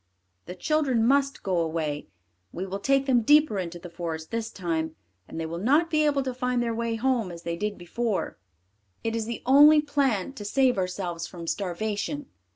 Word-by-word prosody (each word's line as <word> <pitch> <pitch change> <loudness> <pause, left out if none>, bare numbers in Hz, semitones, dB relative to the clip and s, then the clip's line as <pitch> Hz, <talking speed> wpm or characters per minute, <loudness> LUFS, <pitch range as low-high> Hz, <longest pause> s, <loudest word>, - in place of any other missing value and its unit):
The 180 - -6
children 270 - +1
must 275 +2 +2
go 185 -3 0
away; 160 -3 -2 0.4
we 185 - -4
will 195 +1 -4
take 275 +4 +2
them 255 -3 +3
deeper 295 -3 +4
into 175 -1 -4
the 175 - -9
forest 165 -2 -5
this 230 0 -2
time, 160 -5 -3 0.3
and - - -7
they 165 - -2
will 165 +1 -5
not 295 - +3
be 305 -1 +3
able 280 -2 +1
to 260 -1 -3
find 250 0 -1
their 235 -1 0
way 230 0 -1
home 235 -3 0
as 170 0 -10
they 170 0 -2
did 210 +3 -3
before; 205 - -3 0.6
it 225 0 -1
is 225 -1 -1
the 235 - -5
only 295 +4 +8
plan 275 -7 0
to 215 - -8
save 250 +1 +2
ourselves 180 -2 -3
from 170 -2 -9
starvation." 205 - -2
225 Hz, 190 wpm, -26 LUFS, 175-270 Hz, 0.6 s, only